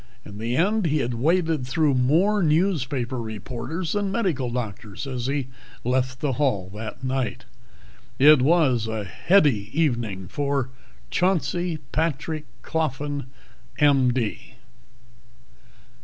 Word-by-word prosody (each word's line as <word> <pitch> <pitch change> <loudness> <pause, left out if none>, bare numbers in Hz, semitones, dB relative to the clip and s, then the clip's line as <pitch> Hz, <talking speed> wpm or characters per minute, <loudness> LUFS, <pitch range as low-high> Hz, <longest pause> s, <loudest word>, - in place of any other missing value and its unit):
In 100 0 -9
the 115 +2 -1
end 200 +2 +2
he 155 0 +1
had 125 -4 -1
waded 160 +1 +1
through 150 +1 +2
more 165 +12 +3
newspaper 145 -7 +1
reporters 120 - -5
than 205 -2 0
medical 180 - 0
doctors 110 -2 -5
as 125 -2 -3
he 140 -1 -1 0.4
left 130 +1 0
the 145 -3 0
hall 100 -10 0
that 110 +4 -7
night. 130 -1 -2 0.7
It 145 0 +7
was 135 -6 +3
a 110 -1 -3
heady 130 - +2
evening 115 - 0
for 140 +2 -1 0.4
Chauncey 180 -2 +1
Patrick 155 0 -1 0.2
Coffin, 145 -3 -2 0.5
M.D. 130 -6 +2
135 Hz, 110 wpm, -24 LUFS, 120-160 Hz, 0.7 s, It